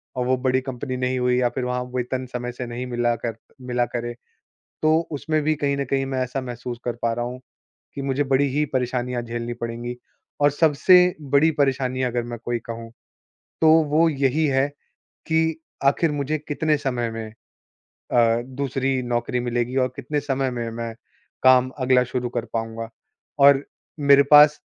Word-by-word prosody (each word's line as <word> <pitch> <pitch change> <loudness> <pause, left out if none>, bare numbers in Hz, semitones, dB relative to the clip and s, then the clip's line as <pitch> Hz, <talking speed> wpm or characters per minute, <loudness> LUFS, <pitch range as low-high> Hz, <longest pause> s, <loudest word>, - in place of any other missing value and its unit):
और 125 -1 -1
वो 130 +1 +2
बड़ी 130 0 +1
कंपनी 130 0 -5
नहीं 130 0 -1
हुई 125 0 +2
या 120 - +3
फ़िर 125 +1 -4
वहाँ 125 0 -1
वेतन 125 +1 -2
समय 125 0 -3
से 125 +1 -6
नहीं 120 +2 -5
मिला 120 -1 0
कर 115 -1 -4 0.3
मिला 125 -1 0
करे, 120 0 -5 0.7
तो 155 +1 +4
उसमें 155 +2 -1
भी 155 - +2
कहीं 140 -1 0
न 140 - 0
कहीं 135 +1 0
मैं 135 -1 -2
ऐसा 125 +2 -3
महसूस 125 -1 -6
कर 120 - -1
पा 115 - +2
रहा 120 +1 -2
हूँ 125 +1 -6 0.6
कि 140 - -4
मुझे 135 +1 0
बड़ी 135 0 +2
ही 150 - +3
परेशानियाँ 125 -1 -1
झेलनी 120 0 -4
पड़ेंगी 120 +1 -5 0.5
और 145 - +6
सबसे 155 +4 +4 0.4
बड़ी 145 +3 +5
परेशानियाँ 130 -2 +1
अगर 120 0 -1
मैं 120 0 -6
कोई 120 0 -1
कहूँ, 115 0 -6 0.7
तो 160 - +5 0.2
वो 155 +3 +3
यही 140 +1 +1
है 135 0 +2 0.6
कि 160 0 +1 0.2
आख़िर 150 +3 +3
मुझे 145 +2 -1
कितने 155 +1 +1
समय 125 -4 -2
में 115 0 -5 0.9
अ, 115 -1 +3
दूसरी 135 0 -2
नौकरी 120 +1 -1
मिलेगी 120 +1 -2
और - - -1
कितने 145 +2 -2
समय 135 -2 -1
में 120 -2 -4
मैं 115 0 -5 0.5
काम 130 0 +6
अगला 130 -1 +4
शुरू 125 0 -3
कर 115 - -1
पाऊँगा? 115 0 -3 0.5
और 140 0 +6 0.4
मेरे 140 -1 +6
पास 150 0 +8
130 Hz, 175 wpm, -23 LUFS, 120-140 Hz, 0.9 s, पास